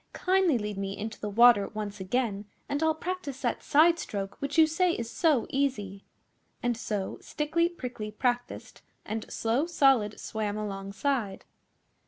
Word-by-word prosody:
Kindly 370 -6 +2
lead 210 -2 -4
me 195 0 -3
into 220 +1 -5
the 210 - -4
water 230 -1 +6
once 210 -1 -4
again 205 +1 -1 0.2
and 285 +2 -2
I'll 320 0 +2
practice 315 -6 -5
that 240 - 0
side 335 +3 +4
stroke 195 -7 -4
which 280 +3 -3
you 320 - +8
say 345 +3 +1
is 235 0 -5
so 305 -8 +2
easy.' 210 -8 -1 0.6
And 240 -1 +1
so 210 -3 -3
Stickly 335 +3 0
Prickly 245 -10 -6
practiced, 245 +3 -3 0.2
and 220 0 -5
Slow 240 +8 0
Solid 270 -10 +3
swam 215 -2 -3
alongside. 200 +2 -3
240 Hz, 150 wpm, -28 LUFS, 210-300 Hz, 0.6 s, you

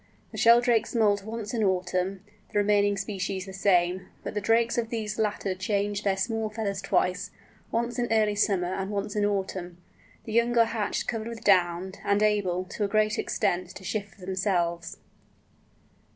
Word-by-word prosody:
The - - -8
Sheldrakes 235 0 +4
moult 205 -3 +3
once 220 0 -5
in 225 -2 0
autumn, 185 0 0 0.3
the - - -2
remaining 205 0 +3
species 195 -1 -3
the 190 - -9
same, 185 -1 +2 0.2
but - - -5
the 210 - -2
drakes 230 +3 +2
of 225 -1 -2
these 215 -2 -3
latter 205 -3 0
change 200 +2 -1
their 195 -2 +1
small 220 +2 -1
feathers 205 -2 -3
twice, 185 -1 0 0.4
once 235 +2 -1
in 240 -2 -1
early 215 -2 +3
summer 190 -3 +1
and 195 0 -3
once 205 0 -3
in 210 - +1
autumn. 190 -3 -2 0.5
The 220 - -6
young 235 +1 +2
are 230 - +7
hatched 225 -3 -2
covered 225 -2 -2
with 230 -1 -7
down, 180 -2 +3
and 200 +1 +2
able, 195 -4 +1
to 195 +3 -4
a - - +2
great 215 +1 +1
extent, 180 -4 0
to 195 - -10
shift 205 +1 -4
for 200 - -20
themselves. 180 -3 -1
205 Hz, 175 wpm, -27 LUFS, 190-220 Hz, 0.5 s, are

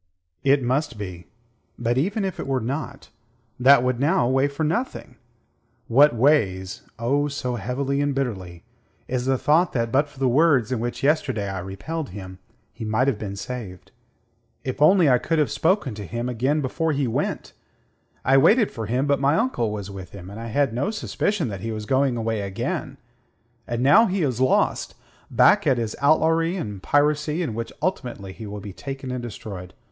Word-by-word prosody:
"It 140 0 +3
must 130 0 -1
be. 90 -4 -7 0.5
But 120 0 0
even 195 - 0
if 190 - -4
it - - -4
were 135 -1 +1
not, 140 +3 -5 0.5
that 130 0 +6
would 125 -1 0
now 140 -3 +2
weigh 135 +2 +2
for 145 +2 -4
nothing. 165 - -2 0.7
What 140 +3 +5
weighs 105 -8 +1 0.2
oh, 140 +6 +1
so 135 -3 -3
heavily 135 +6 -1
and 145 -1 0
bitterly 95 -10 -4 0.4
is 125 0 -2
the 135 0 +2
thought 160 +6 +2
that 115 -2 -1
but 140 +4 +2
for 145 - -20
the 135 -1 +1
words 130 -3 +3
in 125 - 0
which 120 +3 -4
yesterday 135 -8 +1
I 95 -1 -4
repelled 125 - -5
him, 95 -1 -9 0.3
he - - -8
might 110 +5 +1
have 125 -7 0
been 100 -2 -5
saved. 100 -4 -7 0.7
If 130 +2 -4
only 175 +2 +6
I 125 -2 +5
could 165 +5 -1
have 150 -2 +1
spoken 165 - +1
to 105 -1 -7
him 120 +4 -3
again 130 +5 0
before 160 +4 -1
he 140 -1 0
went! 115 - -2 0.7
I 135 +2 +5
waited 215 - +5
for 110 -2 -5
him; 125 +5 0
but 140 -2 +2
my 140 +2 +3
uncle 225 - 0
was 100 -2 -5
with 95 -2 -9
him, 95 -1 -9
and 105 - -8
I 115 - -6
had 135 +1 +1
no 130 - -1
suspicion 210 - -1
that 100 -3 -6
he 115 - -3
was 110 -1 -5
going 130 +1 +1
away 110 -2 -1
again. 95 -1 -4 0.7
And 120 +1 -2
now 210 - +6
he 190 -2 0
is 130 -4 -1
lost 130 - +1 0.3
back - - +4
at 130 - +3
his 115 -2 -2
outlawry 160 +3 +3
and 105 - -5
piracy, 150 - +1
in 125 - -3
which 115 +1 -4
ultimately 120 - -3
he 110 +1 -9
will 105 0 -6
be 100 -1 -8
taken 135 +3 -6
and 125 -1 -3
destroyed. 105 -6 -8
130 Hz, 190 wpm, -23 LUFS, 110-145 Hz, 0.7 s, that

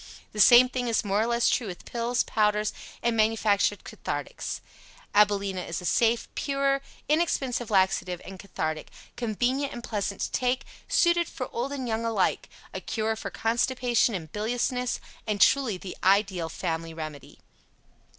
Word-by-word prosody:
The 210 - -7
same 240 +5 +8
thing 250 -1 -3
is 230 -2 +1
more 200 +1 +1
or 225 - +1
less 235 0 +2
true 235 - +1
with 180 -2 -8
pills, 240 +1 0
powders 210 -1 +1 0.3
and 235 - +2
the - - -3
manufactured 215 -2 +2
cathartics. - - -5 0.5
AbilenA 200 -2 +3
is 170 - -2
a 180 - -8
safe, 230 +6 +2
sure, 275 -1 +1 0.3
inexpensive 275 -7 0
laxative 190 -3 +2
and 190 0 -9
cathartic, 155 -5 -4 0.3
convenient 250 +5 -1
and 240 - -7
pleasant 205 -3 -3
to - - -2
take, 255 0 0 0.2
suited 345 -1 +3
for 255 -5 -6
old 245 +4 -2
and 265 -3 -4
young 225 0 -1
alike, 225 -5 0 0.2
a - - -5
cure 220 0 -1
for - - -5
constipation 240 0 +1
and 160 -4 -6
biliousness, 245 +3 -1 0.3
and 210 -1 -1
truly 255 -3 +4
the 180 0 -8
ideal 190 -3 +2
family 165 -1 -3
remedy. 155 -3 -8
220 Hz, 155 wpm, -27 LUFS, 195-245 Hz, 0.5 s, same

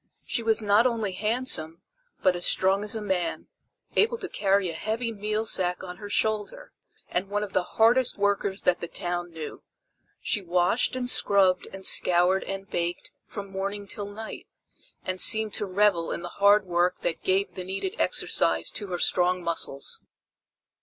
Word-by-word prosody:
She - - -2
was 225 -1 +1
not 210 +4 +4
only 225 -5 -2
handsome, 205 -5 +1 0.4
but 185 - +3
as 175 - -5
strong 190 +2 +2
as 210 +1 -3
a 220 - -4
man, 185 -4 -2 0.5
able 460 +2 +2
to 390 - -6
carry 195 - +1
a 165 - -4
heavy 225 +7 -3
meal 215 +1 -3
sack 180 -4 +1
on 180 -1 -8
her 205 +1 -9
shoulder; 220 - -2 0.4
and 185 +2 -3
one 205 +1 -1
of 200 -3 -7
the - - +2 0.2
hardest 235 +3 +3
workers 200 -1 0
that 180 - +1
the 170 - -5
town 175 +1 -4
knew. 160 -2 -8 0.6
She 210 - 0
washed 180 +7 +1
and 250 -1 -3
scrubbed 195 -6 +3
and 190 0 -8
scoured 180 +2 +4
and 195 0 -6
baked 175 0 -4 0.2
from 200 -2 -8
morning 200 +1 -4
till 200 +1 -5
night, 220 +2 -9 0.6
and 185 0 0
seemed 220 -1 +7
to 205 - -2
revel 190 -3 +1
in 170 - -5
the 175 - -6
hard 200 +2 +3
work 180 0 0
that 165 - -3
gave 190 +1 0
the 185 - -6
needed 195 - -4
exercise - - +1
to 205 - -5
her 180 -2 -4
strong 180 0 +1
muscles. 165 -5 -1
195 Hz, 175 wpm, -26 LUFS, 180-215 Hz, 0.6 s, seemed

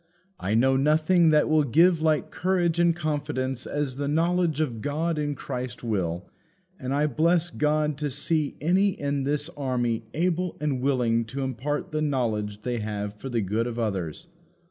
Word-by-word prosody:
I 105 +3 -1
know 130 +3 +4
nothing 155 +4 +4
that 150 -1 +4
will 155 -1 +4
give 165 +5 +4
like 155 -2 +1
courage 175 -2 +1
and 170 -1 +4
confidence 145 -5 -2
as 145 -3 -2
the 145 0 -2
knowledge 165 +1 +1
of 120 -8 -1
God 155 +4 -1
in 145 -1 -1
Christ 125 -4 -5
will; 90 -6 -2 0.5
and 130 0 -4
I 145 +2 +2
bless 165 +4 +2
God 150 -1 0
to 150 -1 -1
see 150 +2 -1
any 185 +5 +2
in 140 -1 -1
this 145 +1 0
army 125 -7 -2
able 180 +2 0
and 145 -4 -1
willing 125 -4 +2
to 135 +5 -4
impart 130 +3 -3
the 155 0 -1
knowledge 110 -8 -1
they 125 -2 -2
have 105 -1 -3
for 110 +6 -8
the 120 -2 0
good 105 +4 -1
of 120 -1 -5
others. 95 -9 -3
145 Hz, 170 wpm, -26 LUFS, 120-155 Hz, 0.5 s, know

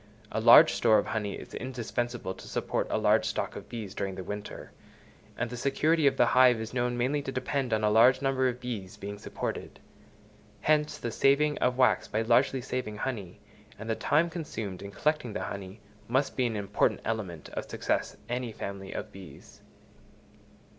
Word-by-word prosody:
A 110 - -1
large 120 +8 +8
store 110 -2 +4
of 105 - +1
honey 105 -3 -2
is - - -11
indispensable 120 -4 -3
to - - -12
support - - -2
a - - 0
large - - +3
stock - - -2
of - - -9
bees 110 -5 -6
during 95 -2 -3
the 95 - -6
winter; 105 +2 -7 0.7
and 120 0 -2
the - - -4
security 150 +5 +2
of 135 -1 +2
the 120 - +5
hive 125 -1 +5
is 110 +1 -6
known 120 -1 0
mainly 135 +4 0
to 135 - -5
depend 130 0 -2
on 110 -1 +1
a 105 - +4
large 120 +4 +6
number 135 -1 +1
of 125 0 -5
bees 115 -7 -6
being 100 +1 -7
supported. - - -5 0.8
Hence 150 0 +2
the 120 - -4
saving 145 +5 +3
of 125 0 +1
wax 130 -1 +3
by 110 - -1
largely 130 +3 +3
saving 120 -4 -4
honey, 105 -6 -5 0.4
and 110 - -8
the 110 - 0
time 165 +8 +2
consumed 110 - -5
in 100 - -7
collecting 150 0 -1
the - - -3
honey, 100 +1 -7 0.3
must 130 +4 0
be 125 -2 +2
an 115 - -3
important 100 -2 0
element 100 -8 -4
of - - -6
success - - -1
any 120 -1 -3
family 100 -2 -6
of - - -5
bees. 95 -3 -13
120 Hz, 185 wpm, -29 LUFS, 105-130 Hz, 0.8 s, large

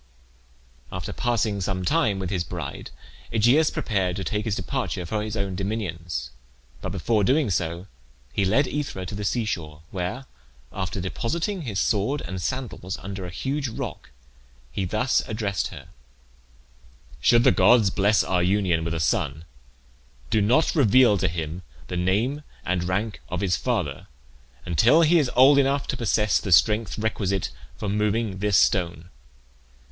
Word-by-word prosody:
After - - -5
passing 110 -4 0
some 95 -1 -2
time 115 - +2
with 95 -2 -4
his 90 -3 0
bride, 85 -6 -6 0.4
Aegeus 120 +8 +4
prepared 95 -5 -1
to 95 - -4
take 105 +1 -2
his 110 -3 0
departure 120 -10 -3
for 105 +5 -2
his 110 +1 -4
own 100 -2 -2
dominions; 85 - -4 0.5
but - - -4
before 110 -3 +1
doing 135 +1 +2
so 85 +1 -2 0.5
he 100 - +1
led 110 +10 +3
Aethra 140 -12 -4
to 90 - -7
the 105 +1 -4
sea 115 +3 0
shore, 80 -6 -5
where, 95 +8 -4 0.5
after 95 +1 -3
depositing 165 - -2
his 110 - -3
sword 110 +8 +1
and 95 +1 -5
sandals 115 -6 -4
under 95 -1 -6
a - - -7
huge 135 +9 -2
rock, 110 - -6 0.6
he 95 +8 -2
thus 110 +8 +1
addressed 105 -3 -2
her: - - -11 1.3
"Should 120 - +4
the - - +6
gods 105 0 +5
bless 105 +2 +3
our 90 -1 +1
union 90 -3 +1
with 85 0 -2
a - - -2
son, 75 +1 0 0.9
do 110 -1 +3
not 125 +10 +3
reveal 130 - +5
to 95 - +2
him 85 0 -4 0.3
the 90 - -3
name 105 +11 0 0.2
and 90 -1 0
rank 100 +4 -2
of - - -3
his 95 -3 +2
father 100 - -2 0.6
until 115 - +4
he 165 +2 +5
is 140 -5 +1
old 140 +2 +7
enough 140 0 +2
to - - 0
possess 110 -2 +2
the 100 - -4
strength 105 +6 +4
requisite 100 -4 -1 0.3
for 105 - -4
moving 105 0 0
this 105 -1 +2
stone. 85 -2 +1
100 Hz, 155 wpm, -25 LUFS, 90-120 Hz, 1.3 s, old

